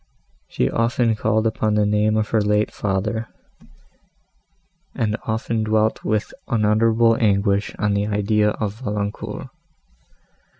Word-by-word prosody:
She 60 - 0
often 115 - +1
called 110 0 0
upon 110 -1 0
the 105 -1 +3
name 105 +1 +2
of 110 -1 -1
her 110 - +2
late 105 +1 +1
father, 105 +3 -2 1.7
and 110 -2 0
often 110 0 -1
dwelt 110 0 +1
with 110 -1 -1
unutterable 115 +1 +3
anguish 100 -2 +1
on 105 -1 0
the 100 +1 0
idea 105 0 +1
of 105 0 -4
Valancourt. 105 -3 -4
105 Hz, 120 wpm, -21 LUFS, 105-110 Hz, 1.7 s, the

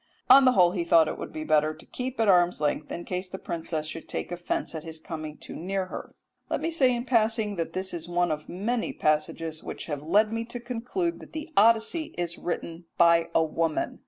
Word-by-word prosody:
On 270 +1 +9
the 255 - +6
whole 180 -4 +5
he 180 -2 -1
thought 165 -2 +5
it - - -4
would - - -6
be 155 - -5
better 155 0 +2
to 155 - -15
keep 255 0 -5
at 225 - +3
arm's 180 -2 +4
length, 150 0 -1
in 175 - -5
case 185 +1 -3
the 190 - -7
princess 160 -3 -4
should 155 +1 -7
take - - -4
offence 175 0 -2
at 160 -2 -5
his 160 -1 -6
coming 155 -3 -7
too - - -9
near 190 +2 -2
her." - - -7 0.3
Let - - 0
me 330 - -2
say 260 -6 +3
in 240 +1 -4
passing 220 -3 +2
that 165 -1 -3
this 190 0 -3
is 170 0 -6
one 175 -1 +1
of 150 0 -4
many 220 +6 -2
passages 155 +1 -1
which - - -6
have 145 -3 -4
led 210 +8 +3
me 230 0 -1
to 240 +1 -6
conclude 250 +9 -3
that - - -13
the 315 +1 -6
Odyssey 230 +9 +3
is 170 -1 -2
written 170 -1 -4
by 170 0 +5
a 165 - +5
woman. 160 0 -1
175 Hz, 225 wpm, -27 LUFS, 160-230 Hz, 0.3 s, On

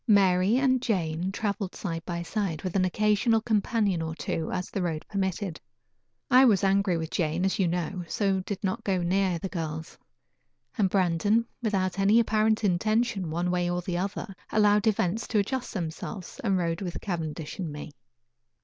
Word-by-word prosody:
Mary 195 0 +4
and 260 -2 +3
Jane 180 -5 -1
traveled 200 -2 -3
side 165 -4 -4
by 170 -1 -3
side, 175 -4 -2
with 185 -1 -3
an 185 -1 +3
occasional 210 +4 +2
companion 210 -4 +1
or 160 0 -3
two, 160 -1 -3
as 180 0 -3
the 195 - -2
road 165 -3 -2
permitted. 190 -3 -2 0.7
I 255 +1 +8
was 210 -8 +4
angry 195 -2 +3
with 160 0 -4
Jane, 165 +2 0
as 195 - 0
you 190 - +3
know, 175 +1 -2
so 195 -1 +1
did 190 +2 -5
not 200 +4 -1
go 185 -3 0
near 185 0 +1
the 180 - -4
girls; 160 -3 -5 0.8
and 205 -6 +2
Brandon, 195 +5 +2 0.2
without 195 -4 0
any 200 +4 +5
apparent 220 -1 +2
intention 210 0 +1
one 175 +3 -1
way 175 -1 0
or 175 0 -1
the 175 0 -2
other, 195 +1 -4 0.2
allowed 210 0 +4
events 210 0 +1
to 220 - 0
adjust 250 +5 -1
themselves, 180 - -5
and 195 -4 +2
rode 165 -1 -1
with 175 -3 -4
Cavendish 160 -3 -4
and 170 -5 -3
me. 150 +1 -7
190 Hz, 175 wpm, -27 LUFS, 175-210 Hz, 0.8 s, I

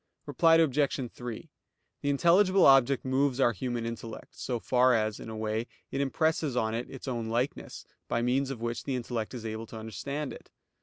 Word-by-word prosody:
Reply 165 -2 +4
Obj. 140 -5 +2
3: 120 +6 -7 0.5
The 145 - -1
intelligible 180 +6 +4
object 135 -1 +5
moves 130 0 +1
our 125 -3 +4
human 120 +3 -3
intellect, 115 -1 -7
so 120 -2 -3
far 125 +1 +3
as, 110 -1 0
in - - -8
a 110 - -6
way, 110 +2 -2 0.2
it 140 - -1
impresses 155 0 0
on 110 -2 +1
it 115 +2 -3
its 135 0 -9
own 120 -3 -2
likeness, 120 +4 -3 0.2
by 115 - 0
means 130 +3 +1
of 130 -4 -6
which 115 0 -3
the 135 - -2
intellect 120 -1 -3
is 115 -2 -7
able 110 +1 -5
to 110 - -9
understand 120 +7 -5
it. - - -13
125 Hz, 190 wpm, -29 LUFS, 115-140 Hz, 0.5 s, object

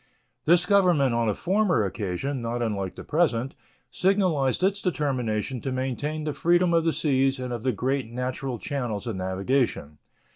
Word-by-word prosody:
This 175 +2 +5
Government 180 -10 +3
on 115 -1 +1
a 105 - 0
former 185 - +1
occasion, 105 +8 -3
not 120 +1 -2
unlike 100 -5 -2
the - - -8
present, 140 -5 0 0.4
signalized 180 -7 +1
its 200 +1 +1
determination 130 - -1
to 135 - -3
maintain 135 +4 -2
the 150 -1 -2
freedom 175 +2 +2
of 165 -1 +3
the 165 - +3
seas 135 -3 +1
and 125 -1 -4
of 120 - -4
the 130 - +1
great 130 +3 -1
natural 125 +1 -3
channels 120 -4 -3
of 115 -4 -3
navigation. 95 - -1
130 Hz, 160 wpm, -26 LUFS, 115-160 Hz, 0.4 s, This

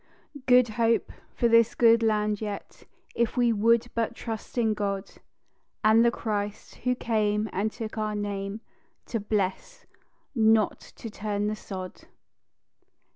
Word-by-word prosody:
"Good 250 -1 +6
Hope" 230 0 +2 0.2
for 240 - +2
this 230 -1 +4
good 230 -1 +5
land 210 -1 +1
yet, 205 -2 -7 0.3
If 235 +1 -1
we 240 -2 +3
would 230 +3 +2
but 230 0 -1
trust 225 +1 -7
in 225 -2 +2
God, 200 -1 -3 0.7
And 220 +2 +6
the 235 - +5
Christ, 210 -2 -4
who 250 0 0
came 215 -3 0
and 210 +3 -1
took 220 -1 -6
our 215 -1 -1
name 205 0 -4 0.4
To 230 - -3
bless, 200 -2 -2 0.5
not 220 -3 +3 0.2
to 225 - -8
turn 205 0 -2
the 210 +1 -1
sod. 185 -3 -8
215 Hz, 135 wpm, -27 LUFS, 205-230 Hz, 0.7 s, Good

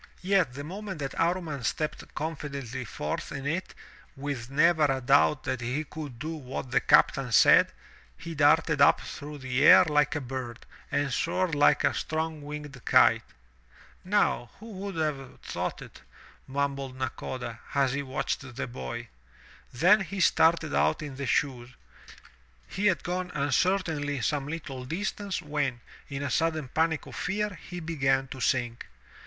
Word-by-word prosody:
Yet 180 -9 +2
the 145 - -5
moment 190 +3 -6
that 140 -2 -4
Amman 165 -6 -1
stepped 155 +6 -3
confidently 140 -5 -4
forth 75 -7 -4
in 140 -1 -5
it, 165 +6 -3 0.4
with 135 -3 -5
never 155 +2 +4
a 135 -2 +1
doubt 135 +2 +3
that 130 - -2
he 125 +6 -2
could 150 -5 -8
do 155 +7 -4
what 130 -4 -6
the 125 - +4
captain 135 -3 +4
said, - - +6 0.5
he 165 - -7
darted 150 0 +3
up 140 - +6
through 150 +1 -8
the 130 -1 -1
air - - +9
like 150 -2 +2
a - - 0
bird, 125 -3 -6 0.3
and 140 -2 0
soared 175 +4 0
Uke 145 0 +4
a - - +3
strong 160 -1 -3
winged 145 -3 -8
kite. - - +5 0.8
"Now 185 - +1
who 225 +2 -10
would 195 -1 -6
have 150 -5 -3
thought - - -4
it?" - - -14 0.5
mumbled 135 -1 -2
Nakoda, 125 -2 -5 0.2
as 135 -2 +3
he 140 - -1
watched 130 -1 -4
the - - -3
boy. 120 -1 -6 0.6
Then 180 - +5
he 195 +1 -5
started 165 -3 +3
out - - +2
in 140 -3 -7
the 140 -1 -3
shoes. 125 -2 0 1.0
He 205 +2 0
had 185 -4 +1
gone 180 +1 -2
uncertainly 145 -2 0
some 140 +5 -1
Uttle 145 -5 -6
distance, 195 +3 -3
when, 145 -5 -1 0.3
in 140 0 -4
a 140 - -2
sudden 160 -5 0
panic 160 +2 0
of - - -10
fear, 210 +3 -1 0.2
he 180 0 -5
began 135 -5 0
to 135 - -7
sink. 120 -2 0
145 Hz, 155 wpm, -28 LUFS, 130-165 Hz, 1.0 s, air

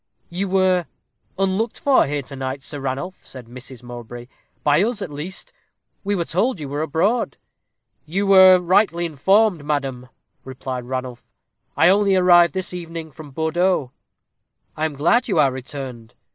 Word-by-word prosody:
"You 185 +3 -3
were 185 -2 +2 0.5
unlooked 195 +4 -1
for 275 - +3
here 145 0 -2
to 140 - -10
night, 135 +1 -5
Sir 145 - -5
Ranulph," 135 +8 -4
said 130 -3 -11
Mrs. 125 +1 -10
Mowbray; 120 0 -9 0.4
"by 150 +3 +4
us, 225 +1 0
at 155 - -7
least: 185 - -7 0.5
we 205 0 0
were 170 -3 -1
told 200 +6 0
you 145 - -5
were 145 +2 -3
abroad." 180 - 0 0.7
"You 195 +6 -1
were 190 -1 +8
rightly 180 -1 +2
informed, 185 +3 +2
madam," 135 -4 -3 0.3
replied 130 -1 -6
Ranulph. 130 -1 -5 0.5
"I - - +6
only 200 0 +3
arrived 175 -3 +5
this 185 -1 -2
evening 165 -2 -7
from 150 0 -11
Bordeaux." 160 -1 0 0.8
"I 155 - -1
am 155 -2 -3
glad 175 - +2
you 195 -7 0
are 140 -3 +4
returned. 130 -3 -8
160 Hz, 155 wpm, -21 LUFS, 135-190 Hz, 0.8 s, were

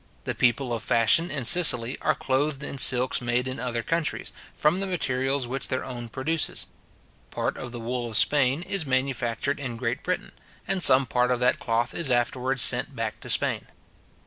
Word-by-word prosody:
The - - -3
people 125 +1 0
of 115 - -4
fashion 115 +12 +2
in 140 -4 -3
Sicily 125 -5 +6
are 155 - 0
clothed 140 +2 -2
in 140 -1 -5
silks 125 0 +4
made 120 +1 -1
in 130 -1 -6
other 120 -1 -3
countries, 165 +2 -3 0.2
from 155 +5 +1
the 195 - -3
materials 135 -6 -2
which 130 +3 -3
their 130 - -3
own 120 -2 -8
produces. 155 +7 -2 0.6
Part - - -3
of 120 - -8
the 120 - -8
wool 120 +1 -4
of 110 - 0
Spain 140 +4 +2
is 195 -2 -1
manufactured 130 -4 -2
in 125 -4 -6
Great 115 +1 -3
Britain, 180 - -4 0.4
and 195 -1 -1
some 130 -4 +6
part 125 +1 0
of 125 -1 0
that 125 - +1
cloth 115 +2 -2
is 170 -5 0
afterwards 125 +2 +1
sent 125 +2 +3
back 115 -2 -5
to - - -11
Spain. - - +1
130 Hz, 185 wpm, -25 LUFS, 120-140 Hz, 0.6 s, Sicily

